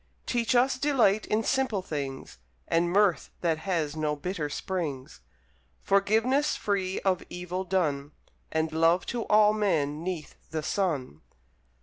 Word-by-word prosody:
Teach 240 0 0
us 255 +1 +3
Delight 240 -8 +3
in 215 +1 +1
simple 230 -8 0
things, 135 - -5 0.3
And 170 +1 +2
Mirth 195 -1 +2
that 165 -2 +1
has 160 -5 -1
no 155 -1 -1
bitter 155 -1 -3
springs, 145 - -4 0.6
Forgiveness 220 +9 +2
free 195 -2 -1
of 185 -2 +1
evil 180 +1 -4
done, 155 -6 -1 0.4
And 160 0 0
Love 165 +3 +3
to 240 -1 -3
all 210 0 +5
men 160 -8 0
'neath 175 -4 -5
the 155 -1 -3
sun! 145 - -2
180 Hz, 130 wpm, -28 LUFS, 155-210 Hz, 0.6 s, all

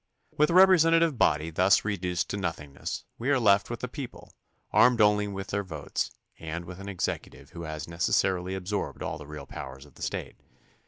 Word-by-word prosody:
With 150 +1 +3
a 170 - +1
representative 165 -6 +6
body 80 -2 +2
thus 95 +5 +4
reduced 90 -4 -1
to 100 - -2
nothingness 80 -7 -4
we 120 +4 -1
are 140 - +4
left 100 -3 +4
with 120 -1 -5
the 125 - -2
people, 125 0 -8 0.4
armed 125 -2 +5
only 105 -1 +4
with 95 -1 -6
their 100 0 -1
votes, 80 -6 -3 0.3
and 80 +1 -5
with 90 +1 -9
an 100 +1 -7
executive 95 -3 -4
who 85 -1 -7
has 80 -1 -5
neces 85 +1 -1
sarily 95 0 0
absorbed 95 +2 -3
all - - -4
the 75 - -10
real 75 -2 -8
powers 65 +1 -8
of 70 - -19
the - - -17
State. - - -4
95 Hz, 195 wpm, -28 LUFS, 80-115 Hz, 0.4 s, representative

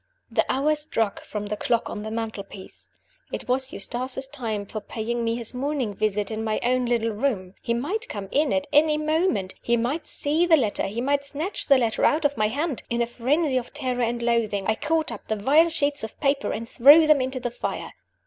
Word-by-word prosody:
The - - +3
hour 285 +4 +2
struck 260 -9 -1
from 210 -1 -5
the 210 +1 -3
clock 235 +2 0
on 210 - -5
the 215 - -5
mantelpiece. 220 -4 -7 0.4
It - - -5
was 260 +1 0
Eustace's 255 +5 -2
time 230 -7 -4
for 215 +2 -6
paying 235 +3 -3
me 230 0 0
his 235 0 -4
morning 260 -4 -2
visit 210 +1 -1
in 220 0 -3
my 215 -1 0
own 250 0 +1
little 230 -1 +1
room. 210 -5 -2
He 235 - -1
might 385 - -3
come 200 -2 -5
in 295 +1 +2
at 285 0 +1
any 300 +1 +5
moment; 305 - 0
he 235 0 +1
might 255 +8 -2
see 315 +4 +1
the 325 -2 +6
letter; 215 -7 0
he 215 +4 -3
might 280 +2 +1
snatch 305 +7 -4
the 275 - +6
letter 230 -3 0
out 305 +1 +3
of 285 0 +2
my 215 -3 +2
hand. 285 +4 -2
In 235 - -1
a - - 0
frenzy 260 +5 0
of 245 -1 -4
terror 255 -4 -2
and 235 0 -1
loathing, 225 -4 +1
I 220 - +2
caught 315 +4 -1
up 225 - -9
the 220 - 0
vile 290 +11 +4
sheets 290 -4 -1
of 220 - -7
paper 280 0 +1
and 230 +1 -4
threw 290 +7 +7
them 305 -3 +5
into 260 0 -2
the 245 -1 -3
fire. - - -4
245 Hz, 215 wpm, -25 LUFS, 220-290 Hz, 0.4 s, threw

